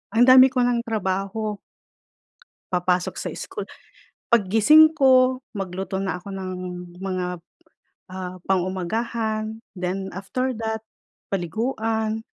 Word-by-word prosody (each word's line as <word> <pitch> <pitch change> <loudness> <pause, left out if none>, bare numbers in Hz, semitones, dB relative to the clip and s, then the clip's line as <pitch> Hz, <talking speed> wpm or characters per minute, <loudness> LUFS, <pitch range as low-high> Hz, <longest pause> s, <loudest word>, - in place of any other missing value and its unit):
ang 235 - +6
dami 255 +1 +9
ko 255 -1 0
ng 245 -1 +2
trabaho. 205 +1 -2 1.1
Papasok 180 0 0
sa - - -4
school - - -6 0.7
pag 230 -5 +4
gising 305 +10 +6
ko, 260 -2 +4
magluto 190 -2 -4
na 195 -1 -2
ako 180 +3 -9
ng 190 -1 -5 0.5
mga, 180 -2 -3 0.6
ah, 185 -1 -7
pang-umagahan, 215 +4 -1 0.2
then 185 +1 -3
after 255 +7 -2
that, 220 0 -3 0.5
paliguan, 220 +3 -2
215 Hz, 105 wpm, -23 LUFS, 185-235 Hz, 1.1 s, dami